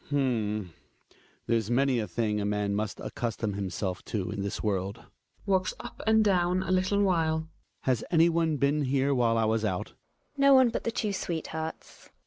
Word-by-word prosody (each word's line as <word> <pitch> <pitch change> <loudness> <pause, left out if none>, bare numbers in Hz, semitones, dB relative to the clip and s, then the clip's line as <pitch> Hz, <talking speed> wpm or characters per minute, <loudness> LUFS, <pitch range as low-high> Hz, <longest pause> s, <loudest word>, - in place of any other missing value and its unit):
Hj.\xmar, 120 -7 0
H'm; 85 - -17 0.7
there's 115 -2 0
many 130 0 +2
a 110 - -2
thing 105 -3 -1
a - - -1
man 105 -1 0
must 105 0 -2
accustom 115 -3 -3
himself 95 -1 -3
to 100 -3 -3
in 105 -1 -4
this 100 0 -4
world. 100 0 -2 0.4
{Walks 190 -2 +1
up - - -9
and 220 0 +5
down 180 -1 +2
a 185 - -3
little 185 +2 +2
while.) 160 -4 +1 0.3
Has 125 -4 0
anyone 165 -2 +3
been 140 +1 +1
here 135 +1 +1
while 120 -3 +2
I 110 - +2
was 110 0 +1
out? 95 -4 -2 0.5
Gina. - - -34
No 275 0 +6
one 260 -2 +6
but 230 - -4
the 230 - 0
two 210 -2 -2
sweethearts. 160 -3 -5
130 Hz, 180 wpm, -28 LUFS, 105-175 Hz, 0.7 s, No